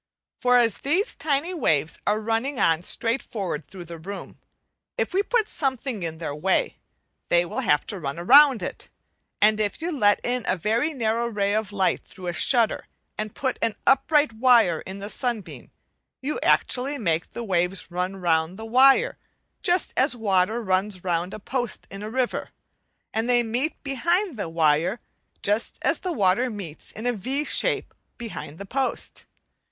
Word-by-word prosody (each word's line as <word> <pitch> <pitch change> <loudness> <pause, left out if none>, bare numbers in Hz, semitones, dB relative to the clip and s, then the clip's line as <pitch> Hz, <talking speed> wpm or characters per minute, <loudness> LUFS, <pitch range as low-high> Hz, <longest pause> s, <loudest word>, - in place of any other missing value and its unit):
For 250 0 +4
as 230 -4 +3
these 360 - +1
tiny 305 +4 0
waves 155 - 0
are 210 +1 +2
running 230 +5 -1
on 165 0 +3
straight 230 +7 -1
forward 180 -9 -4
through 185 -2 -10
the 170 0 -9
room, 195 +5 -8 0.6
if - - -1
we 385 - +3
put 440 +1 +1
something 265 - -2
in 165 -2 -3
their 160 -3 -4
way, 180 +6 0 0.5
they 175 0 +4
will - - -4
have 145 0 +2
to 200 - -4
run 140 -1 -4
round 260 +4 +6
it; - - -6 0.5
and 215 0 +5
if 210 -1 -1
you 335 +2 -2
let 205 -6 +4
in 245 0 0
a 185 - +1
very 225 - 0
narrow 230 -1 0
ray 205 -3 0
of 215 -2 -1
light 190 -2 +1
through 185 - -12
a 175 - -2
shutter 230 +5 +1 0.3
and 215 -1 -5
put 260 -2 -2
an 230 -2 0
upright 290 0 +3
wire 225 -8 +4
in 190 +1 -6
the 200 +1 -6
sunbeam, 235 -2 -4 0.5
you 290 +3 -3
actually 270 +3 +1
make 170 - -1
the 235 - -5
waves 180 -2 -1
run 180 +2 -2
round 170 -1 0
the 220 - -7
wire 270 - +4 0.4
just 355 +1 +1
as 265 0 +2
water 215 +1 +1
runs 190 -1 -1
round 175 0 -1
a - - -6
post 245 +1 -3
in 195 +1 -8
a 210 - -5
river; 255 +1 -1 0.6
and 225 +2 -1
they 240 -1 +4
meet 245 +7 -2
behind 340 +6 0
the 200 -7 -4
wire, 165 +5 +2 0.4
just 210 +3 0
as - - +2
the 365 - -3
water 205 - +2
meets 195 -9 -8
in 220 - -8
a 245 - +2
V 265 +8 -1
shape - - +1 0.2
behind 210 -10 -7
the 200 - -7
post. 265 +6 -2
220 Hz, 175 wpm, -25 LUFS, 185-260 Hz, 0.6 s, round